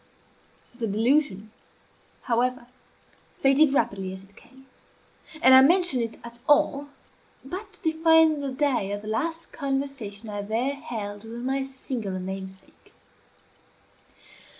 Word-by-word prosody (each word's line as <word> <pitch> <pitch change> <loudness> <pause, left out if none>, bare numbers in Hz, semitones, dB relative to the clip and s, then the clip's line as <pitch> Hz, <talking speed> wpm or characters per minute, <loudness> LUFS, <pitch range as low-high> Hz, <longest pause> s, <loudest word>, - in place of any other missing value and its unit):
The 240 -2 -3
delusion, 220 -1 +1 0.7
however, 250 +1 0 0.7
faded 275 +2 +4
rapidly 195 -8 0
as 190 0 -9
it 195 +1 -21
came; 265 +4 -19 0.8
and 260 - +8
I 260 - +10
mention 345 -2 +4
it 230 -1 -4
at 235 0 -10
all 290 -1 +3 0.6
but 390 +8 -7
to - - -14
define 320 -1 +4
the 280 - -3
day 260 -7 0
of 205 +1 -5
the - - -9
last 325 +10 -3
conversation 270 -7 -4
I 205 -1 -4
there 230 +7 -1
held 220 -8 -6
with 230 +1 -8
my 270 +1 0
singular 255 -7 -5
namesake. 190 0 -9
255 Hz, 125 wpm, -25 LUFS, 210-285 Hz, 0.8 s, I